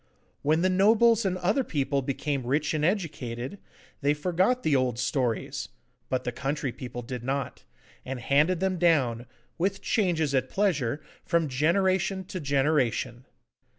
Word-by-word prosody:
When 155 +4 +2
the 185 - +4
nobles 220 +4 +4
and 185 -1 0
other 200 +9 +1
people 140 - -1
became 135 -1 -2
rich 150 +4 +1
and 155 -1 -1
educated, 155 - -2 0.4
they 145 +1 +2
forgot 185 +10 +1
the 150 - +3
old 130 -3 +1
stories, 125 -2 -1 0.4
but 130 - -1
the 125 - -2
country 135 +2 -2
people 120 0 -7
did 125 0 -6
not, 135 +2 -3 0.4
and 130 -1 -5
handed 150 +8 +2
them 190 -2 0
down, 130 -9 +2 0.3
with 195 +3 -1
changes 170 - +1
at 130 -1 +1
pleasure, 155 - 0 0.2
from 170 -2 +1
generation 185 +7 +1
to 185 0 -6
generation. 135 -4 0
150 Hz, 145 wpm, -27 LUFS, 130-185 Hz, 0.4 s, the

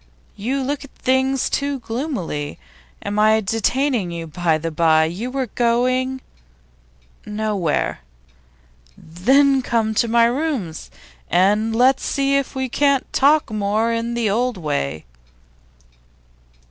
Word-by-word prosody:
'You 260 +7 -2
look 285 +2 -3
at 280 - -12
things 265 0 +1
too 280 0 -1
gloomily. 225 - -4 0.5
Am 205 +1 -2
I 215 +1 +5
detaining 225 +1 0
you, 170 -1 -5
by 165 0 0
the 165 +1 -4
bye? 160 0 +3
You 185 +10 -4
were 265 0 -2
going 255 +3 0 0.5
' - - -34
'Nowhere.' 210 -6 -1 1.0
'Then 265 - +2
come 225 -3 0
to 235 +2 +1
my 230 +1 +4
rooms, 240 - -2 0.4
and 210 +5 +2
let 255 +3 +4
us - - -12
see 275 0 0
if 275 0 -1
we 265 0 -1
can't 280 +1 +1
talk 290 -2 +3
more 215 +2 0
in 230 +1 -2
the 235 -2 0
old 235 +2 0
way. 80 - -3
230 Hz, 130 wpm, -20 LUFS, 180-265 Hz, 1.0 s, I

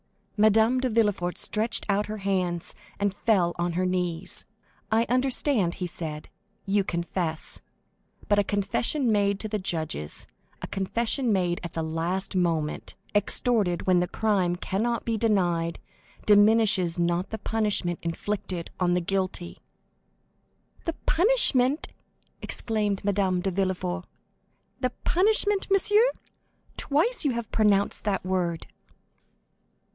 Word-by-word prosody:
Madame 220 +4 +4
de 255 0 0
Villefort 205 -6 +1
stretched 220 +2 0
out 205 0 +1
her 215 +1 -4
hands, 185 -4 -1 0.3
and 200 -1 +1
fell 195 -5 +2
on 175 0 0
her 185 +2 0
knees. 180 -2 -1 0.4
"I 225 +1 +3
understand," 255 - +1
he 180 - -4
said, 155 -3 -5 0.4
"you 200 0 +2
confess; 170 -2 -3 0.7
but 205 0 +3
a - - +4
confession 225 +6 0
made 200 -1 +2
to 220 - -3
the 215 0 -2
judges, 160 - -4 0.3
a - - -5
confession 230 +6 -1
made 180 -3 +1
at 170 - -6
the 165 - -2
last 170 +5 -2
moment, 165 -4 -1 0.2
extorted 205 -3 +1
when 185 -1 +4
the 180 - 0
crime 190 -5 +1
cannot 225 +6 -2
be 230 - 0
denied, 175 -7 +1 0.5
diminishes 205 -4 +4
not 175 +2 0
the 220 - -4
punishment 210 -5 -1
inflicted 175 0 -4
on 175 -1 +2
the 180 - +1
guilty!" 185 -1 -3 1.3
"The 330 - -1
punishment?" 320 - +3 0.5
exclaimed 210 -4 0
Madame 195 -3 +1
de 195 - -1
Villefort, 185 -1 -2 0.7
"the 255 -1 +1
punishment, 410 +2 +2
monsieur? 415 +4 +4 0.7
Twice 330 - +1
you 280 -4 +1
have 235 -2 -5
pronounced 205 -2 +2
that 200 -3 -1
word!" 180 -3 -1
195 Hz, 125 wpm, -26 LUFS, 175-225 Hz, 1.3 s, Madame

